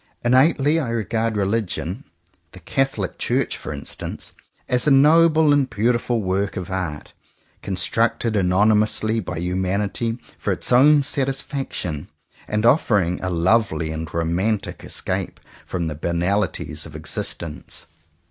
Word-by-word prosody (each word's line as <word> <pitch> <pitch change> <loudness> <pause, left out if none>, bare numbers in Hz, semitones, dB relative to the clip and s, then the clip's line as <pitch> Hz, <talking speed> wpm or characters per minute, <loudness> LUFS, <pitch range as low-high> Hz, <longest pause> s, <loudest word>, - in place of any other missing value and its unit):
Innately 140 +4 +4
I 135 -7 -2
regard 115 -1 -1
religion 100 - -2 0.2
— 85 -1 -37
the 95 - -11
Catholic 110 - -2
Church - - 0
for - - -7
instance - - -5 0.2
— - - -44
as 125 +3 +2
a - - +6
noble 155 +2 +5
and 140 -2 +2
beautiful 120 +1 0
work 95 +2 -1
of 90 0 -5
art, 90 -6 -4 0.5
constructed 115 -2 0
anonymously 105 +3 +2
by 90 -6 -5
humanity 95 +6 -1 0.2
for - - -1
its - - -2
own 145 +4 +6
satisfaction, 135 - -2 0.4
and 105 +1 0
offering 105 - +3
a 95 - -2
lovely 85 -2 +1
and 80 -1 -5
romantic 90 +6 -1
escape - - -3 0.3
from 90 -2 -2
the 80 -2 -3
banali 85 +6 0
ties - - -6
of - - -13
existence. 80 -3 -5
105 Hz, 130 wpm, -22 LUFS, 90-125 Hz, 0.5 s, a